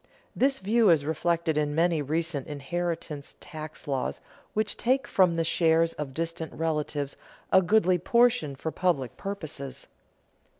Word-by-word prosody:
This 270 +1 +3
view 220 +1 +3
is 155 -4 +4
reflected 160 0 0
in 145 -1 -1
many 165 -1 +2
recent 155 0 -2
inheritance 155 0 -4
tax 155 -1 -8
laws 135 -3 -2 0.4
which 215 0 0
take 265 +3 +1
from 180 -3 +3
the 165 - +1
shares 165 0 +3
of 150 -3 -5
distant 165 -1 -3
relatives 150 -3 -2 0.4
a 190 - +7
goodly 185 -1 +3
portion 235 - +3
for 160 +4 -4
public 155 -10 0
purposes. 155 -9 -6
165 Hz, 135 wpm, -27 LUFS, 150-185 Hz, 0.4 s, a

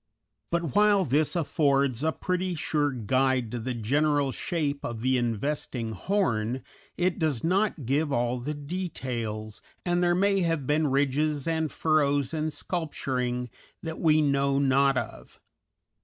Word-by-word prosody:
But 170 -4 -1
while 205 -2 +4
this 150 +5 +1
affords 140 -5 +1
a 160 - +2
pretty 180 +1 -2
sure 150 -1 0
guide 130 0 +1
to 120 - -3
the 125 +2 -3
general 145 +4 +1
shape 145 -2 -2
of 115 -2 -4
the 130 +2 +2
investing 120 0 -2
horn, 125 - -1 0.3
it 180 0 0
does 150 -8 0
not 185 - +1
give 145 +4 +1
all 120 -1 0
the 150 +5 -4
details, 125 - -4 0.2
and 175 0 +1
there 175 0 +3
may 195 +1 +2
have 165 -5 0
been 150 +2 +2
ridges 145 +1 +1
and 160 -2 0
furrows 145 -3 +1
and 155 0 -1
sculpturing 125 - -3 0.3
that 160 -1 -5
we 155 -2 +4
know 140 -1 +2
not 135 0 +3
of. - - -6
145 Hz, 140 wpm, -27 LUFS, 130-160 Hz, 0.3 s, while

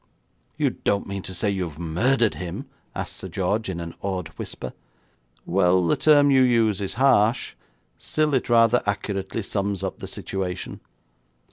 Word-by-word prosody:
'You - - +2
don't 100 - -1
mean 100 0 -4
to 95 - -8
say 100 +3 0
you've 90 -6 -3
murdered 110 +9 +2
him?' 90 -2 -6 0.3
asked - - -4
Sir - - -6
George, 100 +3 -1
in 90 -2 -3
an 85 0 -6
awed 95 -4 -3
whisper. - - -7 0.7
'Well, 90 0 +3
the 85 - +3
term 145 -2 +5
you 135 -1 +5
use 115 -5 +3
is 100 - -3
harsh, 125 -3 +3 0.5
still 155 -1 0
it 130 - +1
rather 115 0 +5
accurately 100 +1 -2
sums 100 -1 -2
up 95 - -4
the - - -6
situation. 95 -2 -4
100 Hz, 155 wpm, -24 LUFS, 90-115 Hz, 0.7 s, term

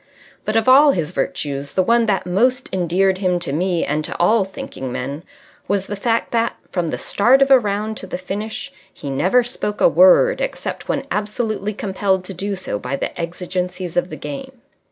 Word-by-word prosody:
But 215 - -1
of 225 +1 +2
all 280 +3 +7
his 160 -4 -2
virtues 140 0 -3
the 185 - +2
one 235 +3 +3
that 195 -5 0
most 250 +8 +1
endeared 185 +1 +1
him 180 -2 +1
to 155 -5 -3
me 175 +2 0
and 150 +2 -1
to - - -6
all 210 +4 +4
thinking 135 -8 -7
men 140 +5 -4 0.5
was 200 -1 0
the 205 - -4
fact 230 +3 -1
that, 230 0 0 0.2
from 175 -3 -1
the - - -2
start 245 +6 +3
of 275 - -1
a 265 - +9
round 210 0 -2
to 190 - -6
the - - -4
finish, 210 +8 -5 0.2
he 140 -6 -7
never 185 - +3
spoke 210 -4 -4
a - - +6
word 185 - +5
except - - -4
when - - -1
absolutely 210 -1 -2
compelled 190 -2 0
to 195 - -7
do 195 +3 -3
so 180 - -4
by 125 +5 -3
the - - -4
exigencies 180 +1 -4
of 175 +1 +1
the - - -7
game. 270 -2 -7
195 Hz, 195 wpm, -20 LUFS, 175-225 Hz, 0.5 s, a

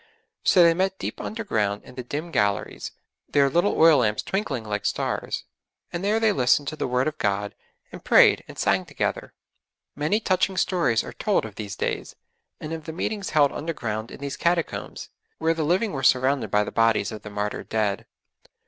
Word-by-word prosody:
So 180 - +6
they 170 0 +6
met 190 +2 0
deep - - -5
underground 110 - -2
in - - -13
the 125 - -6
dim 150 +7 -5
galleries, 105 -6 -1 0.4
their 140 -1 +3
little 175 +7 +2
oil 160 -3 +7
lamps 105 -3 +1
twinkling 175 - -2
like 105 -1 -3
stars, - - -2 0.5
and 175 +1 -3
there 210 +2 +2
they 220 -1 +3
listened 135 -1 +2
to 155 - -6
the - - -2
Word 125 +2 +1
of 155 - -4
God, 100 0 -1 0.4
and - - -10
prayed - - +6
and - - -11
sang - - +2
together. - - -3 0.6
Many 150 +9 +1
touching 190 -2 0
stories 165 -14 +2
are - - -8
told 205 - 0
of 110 - -8
these 105 -1 -6
days; - - -3 0.4
and 155 +1 -6
of 160 -2 -6
the 160 - -6
meetings 200 +3 -3
held 145 -2 +4
underground 115 -8 -4
in - - -11
these 140 -1 -4
Catacombs, 170 -1 -2 0.3
where 160 +1 +1
the 165 - -3
living 185 +7 +1
were 135 - -3
surrounded 130 -2 +2
by 105 +1 +3
the - - -6
bodies 115 0 +2
of 110 - -7
the 105 - -9
martyred 105 0 -4
dead. 105 -3 -1
145 Hz, 190 wpm, -24 LUFS, 110-175 Hz, 0.6 s, oil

